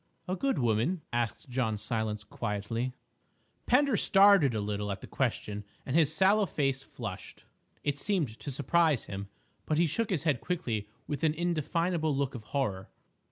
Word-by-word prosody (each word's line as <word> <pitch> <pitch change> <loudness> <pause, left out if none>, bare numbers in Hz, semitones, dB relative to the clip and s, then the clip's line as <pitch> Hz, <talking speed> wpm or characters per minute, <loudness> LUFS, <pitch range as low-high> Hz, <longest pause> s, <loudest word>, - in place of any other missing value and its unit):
"A 185 - 0
good 270 +5 0
woman?" 120 - +1
asked 120 +4 -1
John 120 -4 0
Silence 110 -1 -2
quietly. 115 +4 -3 0.7
Pender 270 0 +4
started 195 - +6
a - - 0
little 105 0 -2
at 100 - -5
the - - -7
question 105 -5 -2 0.2
and 130 - -2
his 160 -3 +4
sallow 195 +5 +4
face 135 -4 0
flushed; 100 -8 -8 0.4
it 145 -1 -1
seemed 155 - -1
to - - -6
surprise 145 +1 +2
him. 100 0 -6 0.4
But 155 - +1
he 170 - +4
shook 225 +8 -1
his 170 -7 0
head 145 -7 +1
quickly 120 - -2 0.2
with 145 -1 -4
an 155 -1 +3
indefinable 165 -1 0
look 140 -1 0
of 115 -4 -8
horror. 105 -10 -2
135 Hz, 160 wpm, -30 LUFS, 110-170 Hz, 0.7 s, started